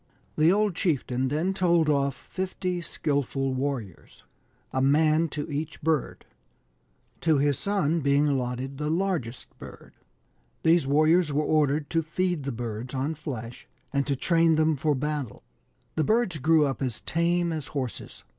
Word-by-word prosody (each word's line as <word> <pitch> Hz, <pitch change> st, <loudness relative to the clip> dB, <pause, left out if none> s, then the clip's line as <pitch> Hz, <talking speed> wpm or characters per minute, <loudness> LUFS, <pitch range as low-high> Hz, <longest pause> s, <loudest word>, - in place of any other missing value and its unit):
The 155 Hz, +3 st, +4 dB
old 210 Hz, 0 st, +2 dB
chieftain 135 Hz, -7 st, 0 dB
then 160 Hz, +8 st, 0 dB
told 175 Hz, -4 st, +2 dB
off 140 Hz, -2 st, +1 dB
fifty 185 Hz, 0 st, -4 dB
skilful 140 Hz, -4 st, -1 dB
warriors,. 130 Hz, -9 st, -5 dB, 0.5 s
a 130 Hz, -, +1 dB
man 155 Hz, +4 st, +3 dB
to 145 Hz, 0 st, -4 dB
each 150 Hz, +1 st, -4 dB
bird, 160 Hz, -2 st, -1 dB, 0.9 s
to 160 Hz, -3 st, +2 dB
his 145 Hz, 0 st, +1 dB
son 185 Hz, -5 st, 0 dB
being 140 Hz, 0 st, +2 dB
allotted 130 Hz, 0 st, -2 dB
the 150 Hz, 0 st, -1 dB
largest 160 Hz, -9 st, -2 dB
bird. -, -, -12 dB, 0.7 s
These 165 Hz, -3 st, +4 dB
warriors 155 Hz, +3 st, +3 dB
were 150 Hz, +1 st, 0 dB
ordered 150 Hz, -1 st, +2 dB
to 165 Hz, -, +2 dB
feed 170 Hz, -1 st, -2 dB
the 140 Hz, -, -2 dB
birds 120 Hz, +2 st, -5 dB
on 135 Hz, +4 st, -1 dB
flesh, 125 Hz, -7 st, -7 dB, 0.3 s
and 140 Hz, -1 st, 0 dB
to 140 Hz, -, +1 dB
train 165 Hz, +3 st, +3 dB
them 155 Hz, 0 st, +2 dB
for 150 Hz, +1 st, +1 dB
battle. 145 Hz, -3 st, -4 dB, 0.5 s
The 155 Hz, -, 0 dB
birds 215 Hz, -3 st, +1 dB
grew 155 Hz, +2 st, +4 dB
up 135 Hz, -1 st, -3 dB
as 125 Hz, -4 st, -3 dB
tame 170 Hz, +1 st, 0 dB
as 155 Hz, -3 st, -4 dB
horses. 130 Hz, -5 st, -5 dB
150 Hz, 150 wpm, -26 LUFS, 135-165 Hz, 0.9 s, The